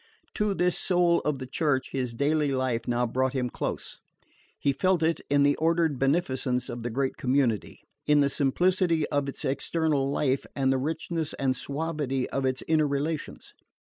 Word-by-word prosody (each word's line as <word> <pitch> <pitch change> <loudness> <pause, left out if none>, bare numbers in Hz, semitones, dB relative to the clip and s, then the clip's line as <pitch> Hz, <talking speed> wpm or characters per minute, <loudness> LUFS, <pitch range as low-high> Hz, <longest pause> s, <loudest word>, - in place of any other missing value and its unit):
To 210 -2 0
this 180 -1 +1
soul 175 -2 +3
of 150 -2 -1
the 130 - -6
Church 135 0 -1
his 125 -3 -3
daily 145 +2 +1
life 130 -3 -1
now 120 0 +1
brought 130 +2 0
him 125 -3 -1
close. - - -4 0.6
He 140 - +1
felt 185 +2 +1
it 165 +1 +1
in 145 0 +4
the 145 0 +4
ordered 165 -3 +1
beneficence 130 -4 0
of 120 - -5
the 120 - -3
great 130 +3 -1
community, 125 -5 0 0.2
in 150 0 +5
the 140 - +4
simplicity 165 +3 +2
of 145 -1 0
its - - -5
external 145 0 0
life 140 -1 0
and 135 -1 +2
the 130 - 0
richness 160 +2 -3
and 135 -2 0
suavity 140 -2 -2
of 135 -1 -1
its 130 0 -2
inner 155 -2 +3
relations. 145 +2 -3
140 Hz, 175 wpm, -27 LUFS, 130-160 Hz, 0.6 s, in